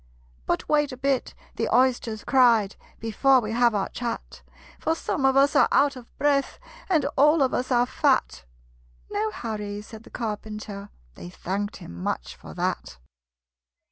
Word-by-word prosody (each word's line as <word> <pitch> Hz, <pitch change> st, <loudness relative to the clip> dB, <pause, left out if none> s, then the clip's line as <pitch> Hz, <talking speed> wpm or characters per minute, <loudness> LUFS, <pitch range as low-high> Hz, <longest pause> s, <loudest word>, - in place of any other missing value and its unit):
"But -, -, -1 dB
wait 295 Hz, -2 st, +2 dB
a 255 Hz, -, -8 dB
bit," 270 Hz, 0 st, -1 dB, 0.2 s
the -, -, -1 dB
Oysters 245 Hz, -4 st, +2 dB
cried, 235 Hz, -7 st, +4 dB, 0.2 s
"Before 255 Hz, +4 st, +3 dB
we 215 Hz, -3 st, -4 dB
have 235 Hz, -1 st, +3 dB
our 195 Hz, -, 0 dB
chat; 240 Hz, -2 st, -5 dB, 0.4 s
For 320 Hz, -, 0 dB
some 285 Hz, -3 st, -2 dB
of 265 Hz, 0 st, +3 dB
us 280 Hz, +1 st, +4 dB
are -, -, +6 dB
out 280 Hz, 0 st, +3 dB
of 245 Hz, -2 st, -11 dB
breath, 280 Hz, -1 st, +1 dB, 0.3 s
And 320 Hz, -7 st, +2 dB
all 300 Hz, +2 st, +5 dB
of 260 Hz, -, 0 dB
us 255 Hz, +1 st, -2 dB
are 245 Hz, -1 st, +4 dB
fat!" 260 Hz, -, 0 dB, 0.7 s
"No 215 Hz, +1 st, 0 dB
hurry," 210 Hz, -2 st, -5 dB
said 220 Hz, 0 st, -11 dB
the -, -, -16 dB
Carpenter: 210 Hz, -2 st, -6 dB, 0.2 s
They 175 Hz, -, -10 dB
thanked 200 Hz, +3 st, -4 dB
him -, -, -10 dB
much -, -, -3 dB
for -, -, -12 dB
that. 65 Hz, -, -3 dB
240 Hz, 160 wpm, -25 LUFS, 210-270 Hz, 0.7 s, are